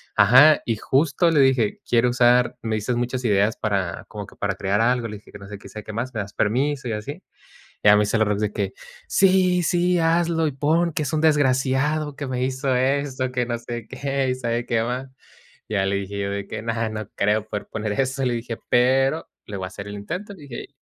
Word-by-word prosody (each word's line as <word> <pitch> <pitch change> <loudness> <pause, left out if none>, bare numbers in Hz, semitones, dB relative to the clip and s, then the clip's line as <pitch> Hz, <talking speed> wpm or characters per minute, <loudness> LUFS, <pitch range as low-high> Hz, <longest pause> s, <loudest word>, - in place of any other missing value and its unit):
Ajá, 130 +9 +7
y 115 - 0
justo 145 - +2
le 150 - +3
dije: 130 -6 +3
"Quiero 120 +1 +3
usar 125 0 +3
me 110 -1 -2
diste 110 +4 -1
muchas 125 +1 -2
ideas 105 0 +2
para 100 -5 -2
como 105 -2 -7
que - - -16
para 100 -2 -2
crear 100 +3 0
algo", 120 0 +1
le 105 -1 -7
dije: 105 - -18
"Que - - -11
no 100 - -11
sé 105 - -10
qué, 100 - -14
que - - -11
sabe 110 -1 -8
qué 110 - -7
más, 120 +3 -4
¿me 110 - -3
das 100 +1 -8
permiso?". 130 +4 0
Y - - -2
así. 105 0 -6 0.6
Y - - +3
ya 105 - +8
me 105 - +4
dice 105 +2 0
la 110 - +3
Rox 105 0 -1
de 105 -1 0
que: - - -2 0.3
"Sí, 185 -2 +3
sí, 175 +2 +2
hazlo 165 0 +2
y 150 - -1
pon 160 +5 +1
que 155 - -1
es 145 +3 -4
un 155 - +1
desgraciado 145 0 +1
que 145 - -4
me 125 -1 -2
hizo 130 0 -1
esto, 130 0 0
que 125 -1 -1
no 120 0 -2
sé 120 0 -7
qué, 135 -1 -2
y 130 - 0
sabe 120 -1 -2
qué 115 -1 0
más". 125 +3 -3 0.6
Ya 100 -2 0
le 100 - 0
dije 100 +1 -5
yo 100 0 -2
de 100 0 -4
que: - - -5
"No, 115 - -2 0.2
no 110 -1 -6
creo 105 +1 +1
poder 105 -1 -5
poner 105 -1 -3
eso", 135 0 -1
le 125 -1 0
dije. 115 -1 -4
"Pero 135 +5 +2 0.2
le 105 - -6
voy 95 -1 -4
a - - -5
hacer 100 +2 -9
el 100 - -7
intento", 180 - -6
dije. 145 -8 -9
125 Hz, 240 wpm, -23 LUFS, 105-140 Hz, 0.6 s, ya